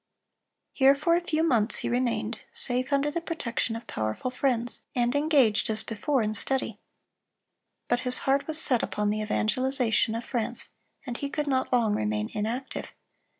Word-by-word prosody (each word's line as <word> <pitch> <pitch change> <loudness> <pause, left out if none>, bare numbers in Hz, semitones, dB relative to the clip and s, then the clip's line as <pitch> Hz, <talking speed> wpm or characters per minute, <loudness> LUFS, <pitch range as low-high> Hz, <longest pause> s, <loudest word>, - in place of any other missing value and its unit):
(335) - - -16
Here 270 +1 +6
for 335 +3 +2
a 345 - -1
few 315 -1 0
months 235 -8 +2
he - - -2
remained, 235 -2 -2
safe 250 +2 -2
under 280 +1 +1
the 340 +2 -3
protection 240 -8 -3
of 230 - -8
powerful 110 - -4
friends, 245 -3 0
and 240 0 +1
engaged 285 -9 +2
as 215 0 +5
before 235 +3 -1
in 215 0 -2
study. 225 -1 0 1.1
But 245 - +1
his 250 0 +9
heart 275 +1 +1
was 315 0 0
set 255 -7 +4
upon 210 0 -2
the 215 0 -2
evangelization 230 +1 0
of 230 - -5
France, 235 -4 -1 0.4
and 245 -3 -5
he 280 - -4
could 300 +1 -3
not 265 -2 -1
long 235 -4 +2
remain 105 - -2
inactive. 230 +6 -4
245 Hz, 170 wpm, -26 LUFS, 220-275 Hz, 1.1 s, his